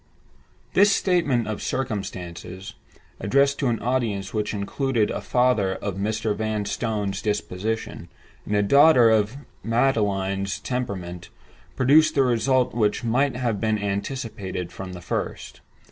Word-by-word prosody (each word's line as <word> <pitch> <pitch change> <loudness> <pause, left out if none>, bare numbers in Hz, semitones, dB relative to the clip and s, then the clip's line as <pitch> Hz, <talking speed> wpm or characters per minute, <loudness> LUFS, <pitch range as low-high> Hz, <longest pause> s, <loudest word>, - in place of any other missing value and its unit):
This 205 +1 +5
statement 160 - +1
of 110 -1 -4
circumstances—addressed 100 +4 -3
to 135 - +1
an 115 -2 0
audience 115 -6 -1
which 105 -2 -1
included 110 +2 -1
a - - -3
father 125 -7 +2
of 100 -1 -4
Mr. 110 +1 -1
Vanstone's 105 -1 -2
disposition, 105 -3 -3 0.3
and 105 - -2
a 105 - +3
daughter 135 0 +6
of 110 +3 +1 0.3
Magdalen's 100 -5 0
temperament—produced 120 - -1
the 135 - +4
result 125 +1 +2
which 110 -2 0
might 125 +3 +1
have 120 -5 -1
been 110 -1 +1
anticipated 100 -3 -4
from 95 -1 -7
the 90 - -8
first. 90 - -4
110 Hz, 115 wpm, -24 LUFS, 100-125 Hz, 0.3 s, daughter